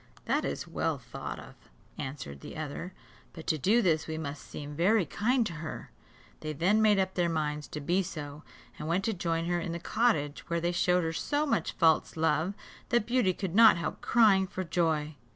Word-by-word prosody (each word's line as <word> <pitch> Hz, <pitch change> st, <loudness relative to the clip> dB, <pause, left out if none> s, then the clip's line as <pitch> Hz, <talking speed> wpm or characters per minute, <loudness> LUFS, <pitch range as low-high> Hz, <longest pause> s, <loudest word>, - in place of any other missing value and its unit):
"That -, -, +1 dB
is -, -, -3 dB
well -, -, -1 dB
thought -, -, -7 dB
of," -, -, -11 dB, 0.4 s
answered 130 Hz, -, -6 dB
the -, -, -9 dB
other, 155 Hz, +4 st, -5 dB, 0.4 s
"but 160 Hz, -, -10 dB
to 155 Hz, -, 0 dB
do 220 Hz, -, +3 dB
this 160 Hz, -4 st, +2 dB
we 160 Hz, 0 st, -3 dB
must 145 Hz, -2 st, -5 dB
seem 145 Hz, 0 st, -7 dB
very 190 Hz, +4 st, +3 dB
kind 235 Hz, -, +1 dB
to 185 Hz, -, -4 dB
her." 160 Hz, -, -7 dB, 0.5 s
They 155 Hz, 0 st, -4 dB
then 185 Hz, +9 st, +2 dB
made 210 Hz, -2 st, +5 dB
up 190 Hz, -1 st, 0 dB
their 175 Hz, -2 st, +1 dB
minds 150 Hz, -2 st, -2 dB
to 150 Hz, -, -6 dB
be 175 Hz, +6 st, +1 dB
so, 150 Hz, -4 st, -6 dB, 0.4 s
and 150 Hz, -, -5 dB
went 175 Hz, +4 st, +1 dB
to 225 Hz, -, +1 dB
join 165 Hz, -3 st, -1 dB
her 175 Hz, 0 st, 0 dB
in 170 Hz, 0 st, -4 dB
the 170 Hz, -, -4 dB
cottage 170 Hz, -8 st, 0 dB
where 170 Hz, 0 st, +1 dB
they 170 Hz, +1 st, 0 dB
showed 180 Hz, 0 st, +2 dB
her 165 Hz, 0 st, -1 dB
so 290 Hz, -, 0 dB
much 225 Hz, -, 0 dB
false 165 Hz, -1 st, +2 dB
love, 160 Hz, +4 st, +1 dB, 0.3 s
that 240 Hz, -3 st, +2 dB
Beauty 240 Hz, -5 st, +2 dB
could 185 Hz, -1 st, -4 dB
not 225 Hz, -2 st, +8 dB
help 170 Hz, -, -4 dB
crying 205 Hz, -5 st, +4 dB
for 185 Hz, -, -4 dB
joy. 160 Hz, -3 st, 0 dB
170 Hz, 205 wpm, -30 LUFS, 155-195 Hz, 0.5 s, not